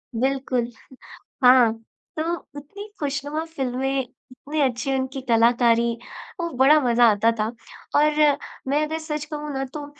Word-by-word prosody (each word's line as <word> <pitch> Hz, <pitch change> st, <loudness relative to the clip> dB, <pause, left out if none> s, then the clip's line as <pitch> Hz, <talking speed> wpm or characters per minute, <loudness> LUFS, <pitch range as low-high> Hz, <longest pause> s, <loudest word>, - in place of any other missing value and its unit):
बिल्कुल, 255 Hz, -1 st, -1 dB, 0.7 s
हाँ, 250 Hz, -2 st, +7 dB, 0.5 s
तो 310 Hz, -, 0 dB, 0.4 s
उतनी 405 Hz, +9 st, -11 dB
खुशनुमा 290 Hz, +2 st, -3 dB
फ़िल्में 270 Hz, -3 st, -2 dB, 0.3 s
इतने 290 Hz, +4 st, -4 dB
अच्छी 265 Hz, 0 st, 0 dB
उनकी 265 Hz, 0 st, -2 dB
कलाकारी, 235 Hz, 0 st, +4 dB, 0.5 s
वो 340 Hz, 0 st, -2 dB
बड़ा 280 Hz, +4 st, +6 dB
मज़ा 240 Hz, -1 st, +4 dB
आता 220 Hz, +3 st, +2 dB
था, 215 Hz, -, +1 dB, 0.5 s
और 300 Hz, -1 st, +4 dB, 0.3 s
मैं 290 Hz, +3 st, +1 dB
अगर 315 Hz, +1 st, -3 dB
सच 305 Hz, -2 st, -4 dB
कहूँ 300 Hz, 0 st, -5 dB
ना 270 Hz, -, -2 dB
तो 295 Hz, -1 st, -6 dB
270 Hz, 130 wpm, -23 LUFS, 245-300 Hz, 0.7 s, हाँ